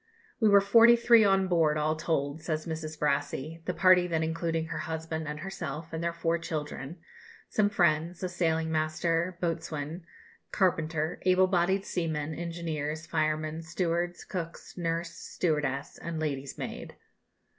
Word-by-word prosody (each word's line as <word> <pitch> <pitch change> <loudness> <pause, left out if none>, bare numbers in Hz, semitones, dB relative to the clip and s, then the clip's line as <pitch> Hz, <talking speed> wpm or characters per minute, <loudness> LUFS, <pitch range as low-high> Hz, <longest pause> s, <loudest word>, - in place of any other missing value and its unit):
"We 220 -3 +4
were 200 -1 +7
forty 230 +4 +7
three 235 -1 +6
on 195 -1 +3
board, 160 -4 +3
all 155 +1 +1
told," 155 -1 -1
says 155 -1 -2
Mrs. 160 -1 -5
Brassey, 150 +2 -1
the 180 - -1
party 180 0 +5
then 160 -2 0
including 165 0 -1
her - - -3
husband 160 -1 -4
and 150 +1 -5
herself 165 -4 -6
and 160 +1 -3
their 170 - +1
four 170 0 0
children, 155 -1 -5 0.5
some 205 -1 +2
friends, 170 -2 +1
a 185 - -1
sailing 160 -2 0
master, 165 +3 0
boatswain, 165 -1 -3 0.4
carpenter, 160 -4 0
able 185 0 +5
bodied 190 +1 +1
seamen, 160 -3 -2
engineers, 160 -2 -4
firemen, 155 0 -1
stewards, 175 +1 -2
cooks, 170 -3 -6
nurse, 165 -1 -2
stewardess, 150 -7 -2
and 165 -1 -4
lady's 140 -3 -3
maid. - - -6
165 Hz, 145 wpm, -29 LUFS, 155-175 Hz, 0.5 s, were